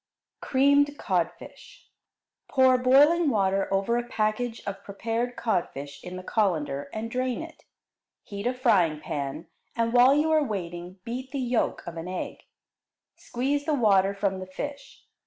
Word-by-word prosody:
Creamed 285 +2 +3
Codfish 175 -3 -4 0.6
Pour 260 -1 +4
boiling 290 +6 +5
water 195 -4 +1
over 195 +5 +1
a 240 - -1
package 225 +1 -2
of 195 -1 -5
prepared 230 +4 -3
codfish 145 - -3
in 180 0 -7
the 185 - -7
colander 155 -10 -1
and 225 +1 -5
drain 255 +4 -1
it. 325 -1 -13 0.6
Heat 200 +1 -5
a 250 - +1
frying 185 - +2
pan, 145 +2 -4 0.3
and, 230 0 0
while 250 +3 +6
you 310 +2 +2
are 310 -1 +4
waiting, 180 -5 -5
beat 255 +4 -5
the 275 - -5
yolk 245 -2 -1
of 170 -1 -7
an 165 +2 -5
egg. 185 0 -6 0.7
Squeeze 280 +4 -2
the 305 - +1
water 200 -5 +3
from 195 -1 -1
the 185 - -7
fish. 280 +9 -8
225 Hz, 150 wpm, -26 LUFS, 185-260 Hz, 0.7 s, while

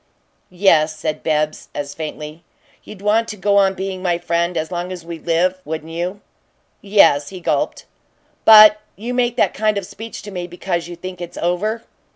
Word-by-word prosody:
"Yes," 165 -4 +3
said 155 0 -3
Bibbs, 155 -1 -1
as 145 -1 -4
faintly. 155 +1 -7 0.4
"You'd 200 -2 -12
want 220 +2 +2
to 210 - -6
go 200 +1 +2
on 195 -1 +3
being 190 0 -4
my 175 -2 0
friend 170 0 -1
as 160 +2 -3
long 175 +1 -4
as 175 -3 -8
we 170 -1 -7
live, 180 +3 0
wouldn't 160 +1 -6
you?" 180 +5 -4 0.6
"Yes," 195 -8 +4
he 185 - -9
gulped. 175 - -1 0.6
"But 215 -1 +9
you 235 +5 -5
make 245 -1 +1
that - - +2
kind 215 -1 0
of 200 - -3
speech 225 +5 -9
to 205 - -8
me 180 -2 -5
because 175 -1 -3
you 175 - -8
think 180 +1 -8
it's 175 - -8
over." 210 +7 -1
180 Hz, 185 wpm, -19 LUFS, 165-200 Hz, 0.6 s, But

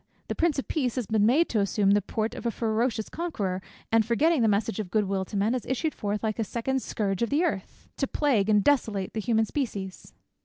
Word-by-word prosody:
The - - 0
Prince 330 -4 +1
of 275 - -3
Peace 255 -6 -1
has 250 -3 -1
been 215 0 +2
made 300 +8 +4
to 220 - +1
assume 200 0 +2
the 205 +1 +4
port 220 +3 -2
of 235 - -4
a - - +2
ferocious 225 0 -1
conqueror, 205 - -3 0.3
and 225 0 +5
forgetting 280 +7 +2
the 225 - +4
message 205 -1 0
of 205 -4 -3
good 210 +3 +2
will 190 0 -1
to 205 - -5
men, 210 +4 +2
has 255 - -2
issued 295 +4 -1
forth 205 +1 -3
like 220 0 -1
a - - +2
second 255 +5 -2
Scourge 195 -4 -2
of 235 - +1
the 300 +5 +2
Earth, 200 - -3
to 275 - 0
plague 245 -10 +1
and 210 -2 +4
desolate 215 -9 +1
the 220 - -2
human 225 0 +2
species." 205 -8 -5
220 Hz, 235 wpm, -27 LUFS, 205-260 Hz, 0.3 s, and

